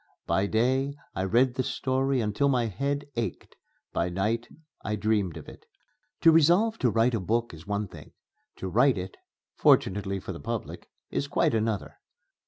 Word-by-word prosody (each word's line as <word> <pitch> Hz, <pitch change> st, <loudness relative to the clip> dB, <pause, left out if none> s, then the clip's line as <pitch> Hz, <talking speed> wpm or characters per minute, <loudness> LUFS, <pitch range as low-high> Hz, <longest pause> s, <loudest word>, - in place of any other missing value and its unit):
By 95 Hz, +1 st, +1 dB
day 130 Hz, +6 st, +1 dB, 0.2 s
I 95 Hz, -, -2 dB
read 120 Hz, +6 st, +3 dB
the 130 Hz, -, -1 dB
story 130 Hz, 0 st, 0 dB
until 110 Hz, +6 st, +1 dB
my 125 Hz, -3 st, +2 dB
head 140 Hz, +7 st, -2 dB
ached; 115 Hz, -2 st, -4 dB, 0.4 s
by 85 Hz, -, 0 dB
night 105 Hz, +6 st, -1 dB, 0.4 s
I 105 Hz, -, -1 dB
dreamed 105 Hz, -4 st, 0 dB
of -, -, -10 dB
it. 450 Hz, -, -13 dB, 0.5 s
To 165 Hz, -, +7 dB
resolve 175 Hz, +8 st, +4 dB
to 125 Hz, -, +3 dB
write 115 Hz, +3 st, +2 dB
a 115 Hz, -, +1 dB
book 115 Hz, +4 st, -1 dB
is 80 Hz, +1 st, -12 dB
one 105 Hz, 0 st, -1 dB
thing; -, -, -13 dB, 0.4 s
to 95 Hz, -, -5 dB
write 125 Hz, +5 st, +3 dB
it 95 Hz, +1 st, -5 dB, 0.4 s
fortunately 95 Hz, 0 st, +2 dB
for -, -, -6 dB
the -, -, -8 dB
public -, -, -5 dB, 0.2 s
is 140 Hz, -, -1 dB
quite 140 Hz, -, +1 dB
another. 110 Hz, -2 st, -2 dB
115 Hz, 170 wpm, -27 LUFS, 100-135 Hz, 0.5 s, To